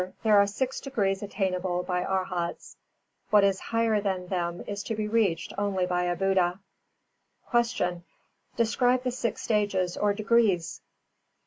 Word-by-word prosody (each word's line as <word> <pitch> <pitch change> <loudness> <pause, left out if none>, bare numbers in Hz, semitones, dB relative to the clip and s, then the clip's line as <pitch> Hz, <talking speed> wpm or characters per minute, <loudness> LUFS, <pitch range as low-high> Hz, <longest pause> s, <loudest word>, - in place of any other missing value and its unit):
There 215 -2 +6
are 200 - +5
six 260 +6 -2
degrees 200 -8 -1
attainable 185 -3 -1
by 180 0 -1
Arhats; 185 -3 -3 0.5
what 210 -1 +5
is 195 -1 +2
higher 230 -2 +1
than 190 -3 -2
them 175 -2 -2
is 205 -1 -4
to 225 - -2
be 215 0 -2
reached 210 -6 0
only 195 -3 0
by 180 0 0
a 175 0 0
Buddha. 190 -1 +1 0.9
376. 235 -6 +2 0.7
Q. 235 - +4
_Describe 245 +3 +2
the 250 - 0
six 240 -3 -3
stages 200 -4 0
or 205 -1 +1
degrees? 205 -6 +1
200 Hz, 145 wpm, -27 LUFS, 180-220 Hz, 0.9 s, There